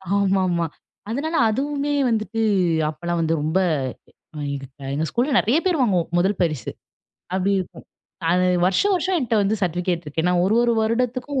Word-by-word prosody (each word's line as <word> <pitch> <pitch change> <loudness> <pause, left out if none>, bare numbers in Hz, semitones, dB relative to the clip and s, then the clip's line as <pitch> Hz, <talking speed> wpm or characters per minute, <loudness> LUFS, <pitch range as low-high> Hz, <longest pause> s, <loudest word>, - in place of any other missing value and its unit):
ஆமா 195 -1 +2
ஆமா. 170 -1 0 0.4
அதனால 310 +8 -2
அதுவுமே 285 +4 -1 0.2
வந்துட்டு 225 0 -1 0.5
அப்பெல்லாம் 170 +2 -3
வந்து 165 0 +1
ரொம்ப, 160 +5 +1 0.9
எங்க 140 -1 -4 0.3
எங்க 155 +2 -1
ஸ்கூல்ல 260 +4 0
நெறைய 250 +9 +2
பேர் 350 -5 +2
வாங்குவோம் 185 -8 +1
முதல் 190 +2 +2
பரிசு. 155 -6 -1 0.6
அப்டி 190 +1 +1
இருக்கும், 185 - -7 0.8
வருஷம் 385 - +2
வருஷம் 370 +1 0
என்ட்ட 235 -3 -1
வந்து 200 +2 +1
சர்டிபிகேட் 175 -1 -1
இருக்கு. 150 +2 -3
ஏன்னா 180 0 +2
ஒரு 205 +4 +2
ஒரு 240 -1 +2
வருடத்திற்கும் 250 +4 -1
200 Hz, 145 wpm, -22 LUFS, 175-255 Hz, 0.9 s, ஆமா